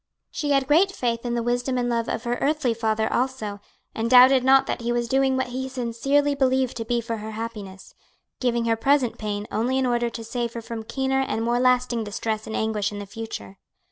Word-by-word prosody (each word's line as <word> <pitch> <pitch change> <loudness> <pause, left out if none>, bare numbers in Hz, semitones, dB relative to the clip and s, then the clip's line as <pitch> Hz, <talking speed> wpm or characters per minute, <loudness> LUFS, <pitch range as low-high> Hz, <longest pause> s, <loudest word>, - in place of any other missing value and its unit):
She 295 - -3
had 275 -2 +3
great 335 +8 +4
faith 240 -7 -2
in 240 - -1
the 235 - -1
wisdom 245 +2 -1
and 245 -1 0
love 235 -1 -1
of 225 - -3
her 240 0 -2
earthly 290 -4 +1
father 220 -1 0
also, 240 -6 -2 0.3
and 225 +1 -2
doubted 255 +1 +7
not 265 +1 +5
that - - -3
he 235 +1 -1
was 240 0 0
doing 265 +1 +2
what 260 -1 -1
he 260 +1 -4
sincerely 265 +4 0
believed 260 -2 +1
to 225 - -4
be 240 0 0
for 230 0 -4
her 215 +1 -7
happiness, 210 -4 -7 0.5
giving 240 -2 0
her 230 -1 +2
present 265 +1 +1
pain 210 -1 -3
only 240 +5 0
in 265 - +1
order 240 -1 +1
to 230 0 -7
save 235 +1 -3
her 235 - -5
from 230 0 -6
keener 265 +4 -1
and 225 -4 -2
more 240 +1 +1
lasting 250 -2 +2
distress 215 +1 -3
and 220 - -4
anguish 215 -2 -1
in 205 - -6
the 205 - -6
future. 195 - -8
240 Hz, 220 wpm, -24 LUFS, 225-260 Hz, 0.5 s, doubted